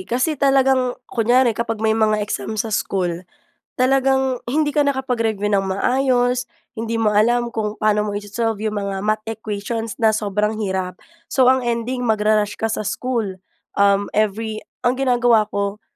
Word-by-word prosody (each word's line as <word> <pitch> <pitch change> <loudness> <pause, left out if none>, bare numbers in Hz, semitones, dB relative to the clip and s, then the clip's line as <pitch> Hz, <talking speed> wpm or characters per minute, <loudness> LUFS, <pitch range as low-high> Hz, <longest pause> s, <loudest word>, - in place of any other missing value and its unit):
Kasi 255 +7 +1
talagang 265 -2 +3
kunyari 240 +1 +2
kapag 225 0 -2
may 220 - +4
mga 215 -1 +2
exam 215 +1 -4
sa 220 +1 -2
school, 185 -6 -1 0.6
talagang 265 0 +2
hindi 295 +5 +1
ka 295 0 +2
nakapag-review 235 -7 -1
nang 195 -1 +1
maayos, 250 +4 +1 0.3
hindi 225 0 -2
mo 215 - +3
alam 235 +3 +2
kung 215 -2 -3
paano 210 -1 +2
mo 210 - -3
iso-solve 210 +1 -3
'yong 215 -1 -2
mga 200 -1 -3
math 215 +1 -1
equations 220 0 -4
na 220 -2 +3
sobrang 210 0 0
hirap. 190 -2 -3 0.3
So, 255 -2 +5
ang 260 -1 +2
ending 240 +2 -2
magra-rush 215 -2 +2
ka 225 - +1
sa 215 -1 -3
school, 215 -4 -2 0.3
um, 200 0 +3
every 215 +1 -1 0.2
ang 245 - +4
ginagawa 240 -4 +3
ko, 200 +1 -3
220 Hz, 155 wpm, -20 LUFS, 210-245 Hz, 0.6 s, So